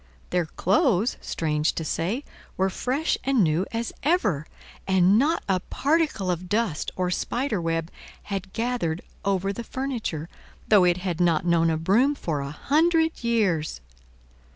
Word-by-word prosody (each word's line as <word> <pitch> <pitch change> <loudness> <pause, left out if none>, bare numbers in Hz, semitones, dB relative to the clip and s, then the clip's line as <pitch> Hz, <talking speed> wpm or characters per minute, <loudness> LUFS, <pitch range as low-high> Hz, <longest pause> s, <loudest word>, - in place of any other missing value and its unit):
Their 175 -3 +1
clothes, 240 - +2
strange 155 -1 0
to 160 - -4
say, 195 - -1 0.3
were 190 0 +1
fresh 270 - -1
and 265 -5 +3
new 165 +3 +1
as 230 0 -3
ever; 210 - +1 0.4
and 190 +2 +4
not 310 +6 +1
a 190 -2 +2
particle 280 - 0
of 180 +1 -4
dust 210 -7 0
or 180 -1 -1
spider 235 +1 -1
web 165 0 -2 0.3
had 195 -1 -5
gathered 225 -9 -2 0.2
over 195 0 0
the 235 - -6
furniture, 230 - -3 0.4
though 205 -4 +6
it 175 0 +3
had 180 -2 -3
not 170 -2 +2
known 170 -1 +3
a 160 - +1
broom 225 - +3
for 160 - -2
a 140 0 -4
hundred 320 - +1
years. 195 - +1
190 Hz, 150 wpm, -25 LUFS, 170-245 Hz, 0.4 s, though